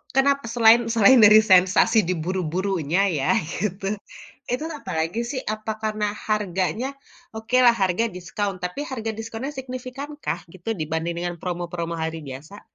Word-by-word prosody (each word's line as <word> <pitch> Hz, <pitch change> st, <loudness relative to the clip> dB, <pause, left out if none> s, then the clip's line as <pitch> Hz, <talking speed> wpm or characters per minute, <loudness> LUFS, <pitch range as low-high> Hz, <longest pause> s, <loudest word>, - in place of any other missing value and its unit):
kenapa 275 Hz, -1 st, +3 dB
selain 230 Hz, 0 st, +7 dB
selain 230 Hz, +3 st, +6 dB
dari 215 Hz, +1 st, +9 dB
sensasi 185 Hz, +5 st, +5 dB
diburu-burunya 180 Hz, 0 st, -1 dB, 0.2 s
ya, 135 Hz, -, -1 dB, 0.2 s
gitu, 195 Hz, 0 st, -3 dB, 0.7 s
itu 250 Hz, +5 st, -1 dB, 0.2 s
apalagi 165 Hz, +3 st, -2 dB
sih, 260 Hz, -, -3 dB
apa 215 Hz, 0 st, -4 dB
karena 215 Hz, -1 st, -1 dB, 0.2 s
harganya? 210 Hz, +3 st, -1 dB, 0.5 s
Okelah 240 Hz, +2 st, +4 dB
harga 185 Hz, +4 st, +2 dB
diskon, 195 Hz, +3 st, -3 dB
tapi 180 Hz, +9 st, -4 dB
harga 225 Hz, -3 st, -3 dB
diskonnya 225 Hz, +5 st, -5 dB
signifikankah, 260 Hz, -, -5 dB
gitu, 185 Hz, +3 st, -8 dB
dibanding 160 Hz, +2 st, -2 dB, 0.3 s
promo-promo 175 Hz, -1 st, -3 dB
hari 160 Hz, 0 st, -3 dB
biasa? 150 Hz, +10 st, -10 dB
205 Hz, 120 wpm, -23 LUFS, 175-235 Hz, 0.7 s, dari